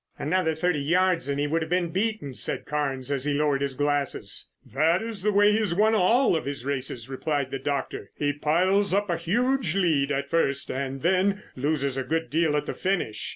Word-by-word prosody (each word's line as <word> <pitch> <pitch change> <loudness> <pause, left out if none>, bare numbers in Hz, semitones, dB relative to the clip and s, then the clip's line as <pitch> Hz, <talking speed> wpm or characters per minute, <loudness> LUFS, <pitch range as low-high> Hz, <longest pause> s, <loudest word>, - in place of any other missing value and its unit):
"Another 160 +1 0
thirty 160 -1 0
yards 175 0 +1
and 140 0 -1
he 145 - +1
would 160 +3 0
have 160 - -4
been 180 -1 +1
beaten," 200 -7 -2
said - - -1
Carnes 140 -2 -2
as 135 -2 -1
he 145 -1 0
lowered 145 -1 +1
his 140 -2 -1
glasses. 145 0 -1 0.2
"That 160 +6 +2
is 225 -4 -5
the 210 +2 +1
way 205 +1 +5
he 210 - +2
has 205 -6 0
won 215 +3 +3
all 225 +3 +3
of 160 - -2
his 140 -3 -5
races," 130 -4 -3
replied 135 0 -2
the 135 - -3
doctor. 135 -7 -3
"He 145 0 0
piles 185 +7 +2
up 200 -2 0
a 170 - 0
huge 235 - 0
lead 155 -7 +2
at 140 0 -1
first 140 -5 0
and 135 +1 -4
then 190 +3 +2
loses 140 -1 -1
a - - -2
good 160 0 -2
deal 155 -1 +2
at 145 - -2
the - - -4
finish. 185 - -2
155 Hz, 210 wpm, -26 LUFS, 140-185 Hz, 0.2 s, way